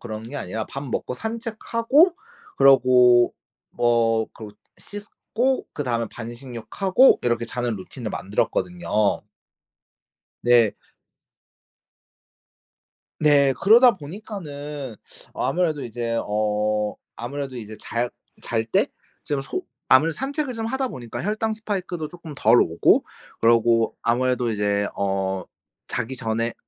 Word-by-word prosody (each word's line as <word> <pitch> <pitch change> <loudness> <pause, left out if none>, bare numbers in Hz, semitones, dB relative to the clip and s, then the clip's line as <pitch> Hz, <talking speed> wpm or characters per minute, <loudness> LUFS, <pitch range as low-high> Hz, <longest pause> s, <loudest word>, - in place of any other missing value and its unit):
그런 110 -2 -6
게 145 - -10
아니라 110 +1 -4
밥 135 - -7
먹고 125 -2 -3
산책하고 230 - +1 0.4
그러고 125 -3 +6 0.4
뭐 115 -2 +2
그러고 105 -2 -11 0.2
씻고 225 +5 -3
그다음에 120 -5 -1
반신욕하고 125 - +1
이렇게 120 -1 0
자는 120 -1 -2
루틴을 105 +4 -7
만들었거든요. 175 - -2 1.5
네. 120 -3 +4 2.4
네. 145 -3 +5
그러다 235 +5 +7
보니까는 150 - -7 0.4
아무래도 165 -5 0
이제 115 0 -3
어 105 0 0 0.2
아무래도 135 +2 -5
이제 110 -2 -8
잘 120 +2 -2 0.3
잘 115 -1 -1
때 110 - +2 0.4
좀 145 -2 -1
소 370 - -4 0.3
아무래도 155 +5 +5
산책을 280 0 -3
좀 225 0 -3
하다 265 +2 -1
보니까 120 - -7
혈당 215 +2 -1
spike도 190 -7 -4
쪼끔 165 -4 -10
덜 115 +1 +5
오고 80 +1 +3 0.3
그러고 115 0 +3
아무래도 125 0 +1
이제 105 -1 0
어 95 -1 -1 0.4
자기 120 +3 -3
전에 115 -1 -1
에 - - -5
125 Hz, 255 characters per minute, -23 LUFS, 115-180 Hz, 2.4 s, 그러다